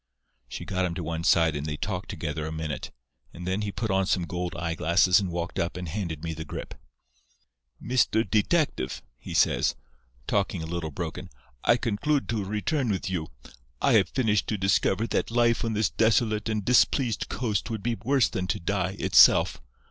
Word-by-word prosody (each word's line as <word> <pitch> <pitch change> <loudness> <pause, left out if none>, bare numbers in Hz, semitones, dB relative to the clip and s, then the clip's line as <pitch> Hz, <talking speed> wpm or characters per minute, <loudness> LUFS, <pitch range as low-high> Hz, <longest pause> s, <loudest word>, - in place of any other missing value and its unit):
"She - - -7
got 95 -1 -1
him 85 -2 -3
to 85 - -4
one 80 +1 -3
side 80 -2 +3
and 70 +1 -3
they 75 -1 -3
talked - - -4
together 75 0 -4
a - - -5
minute, 80 -4 -4 0.5
and 90 - -8
then 95 +3 -1
he 105 -1 -2
put 110 +1 -3
on 95 0 +1
some 90 -3 +1
gold 90 0 -4
eyeglasses 85 +3 +3
and 95 -2 -2
walked 85 0 -4
up 85 +1 -2
and 90 -1 -5
handed 85 -4 -4
me 80 -1 -3
the 80 0 -6
grip. - - -7 1.1
"'Mr. 115 -3 +1
Detective,' 110 - 0 0.2
he - - -7
says, - - +3 0.5
talking 95 -2 -1
a - - -4
little 85 -1 -3
broken, 70 - -6 0.4
'I 120 - +5
conclude 130 +6 0
to 110 -4 -1
return 110 +7 -1
with 95 -2 -2
you. 80 -4 -2 0.5
I - - +3
have - - +4
finished 105 -6 +1
to 110 - -1
discover 95 +2 +1
that - - -1
life 120 0 +2
on 115 -1 -1
this 105 -3 +1
desolate 110 -1 +2
and 105 -2 -2
displeased 125 -1 +2
coast 110 -4 -2
would 110 -3 -4
be 120 - 0
worse 135 +1 +3
than 90 -1 -3
to 90 - -1
die, 95 +1 -1
itself. - - +5
95 Hz, 185 wpm, -26 LUFS, 85-110 Hz, 1.1 s, I